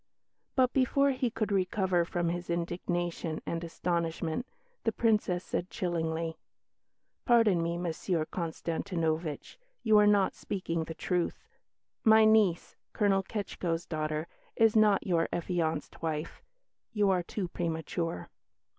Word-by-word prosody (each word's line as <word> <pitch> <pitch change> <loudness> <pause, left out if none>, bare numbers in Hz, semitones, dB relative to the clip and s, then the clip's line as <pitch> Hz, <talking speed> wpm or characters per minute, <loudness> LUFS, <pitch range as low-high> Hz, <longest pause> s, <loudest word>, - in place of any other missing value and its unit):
But 255 -1 +3
before 275 +1 +3
he 255 -2 0
could 215 -2 -2
recover 185 -2 +1
from 175 0 -1
his 175 +1 -4
indignation 175 -1 -2
and 165 0 -3
astonishment, 170 +4 -2 0.4
the 225 - +2
Princess 210 -6 +1
said 180 - -3
chillingly, 165 -2 -2 0.8
"Pardon 225 -7 +4
me, 170 +1 -1
Monsieur 170 -1 -1
Konstantinovitch, 165 - -3 0.2
you 220 -2 +6
are 210 - +5
not 205 -2 +4
speaking 170 -4 -3
the 165 - -7
truth. 180 0 -1 0.6
My 220 0 +7
niece, 215 -6 +3 0.2
Colonel 200 -2 +3
Ketschko's 180 -4 -3
daughter, 155 -1 -2 0.3
is 225 -1 +4
not 210 -2 +4
your 170 -3 +1
affianced 165 -3 -2
wife. 160 -1 -3 0.5
You 205 -3 +3
are 185 -1 +2
too 185 +2 -4
premature." 165 - -3
175 Hz, 120 wpm, -30 LUFS, 165-205 Hz, 0.8 s, My